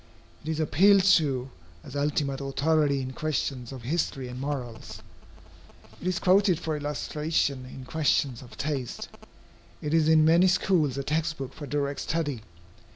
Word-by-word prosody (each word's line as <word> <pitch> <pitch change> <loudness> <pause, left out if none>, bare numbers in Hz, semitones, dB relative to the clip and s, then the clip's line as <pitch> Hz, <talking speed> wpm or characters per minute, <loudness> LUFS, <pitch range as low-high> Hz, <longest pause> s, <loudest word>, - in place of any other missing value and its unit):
It 155 - -6
is 160 -1 -1
appealed 190 +6 +5
to 140 -9 +3 0.3
as 135 - -10
ultimate 140 -1 -1
authority 140 0 +1
in 130 0 -5
questions 135 -4 -2
of 130 -3 -8
history 135 -2 -2
and 125 +1 -7
morals. 120 -6 -5 1.0
It 180 - -4
is 185 -1 0
quoted 190 -2 +3
for 160 -1 -2
illustration 145 -2 -1
in 130 0 -10
questions 140 -3 0
of 125 -2 -13
taste. 140 -5 -3 0.7
It 150 +1 -3
is 160 -1 +4
in 155 -1 +6
many 170 +3 +5
schools 175 -7 +2
a 140 - -2
text 155 +2 -1
book 135 -2 -6
for 145 - -8
direct 140 0 -2
study. 145 -7 -2
145 Hz, 155 wpm, -27 LUFS, 135-160 Hz, 1.0 s, in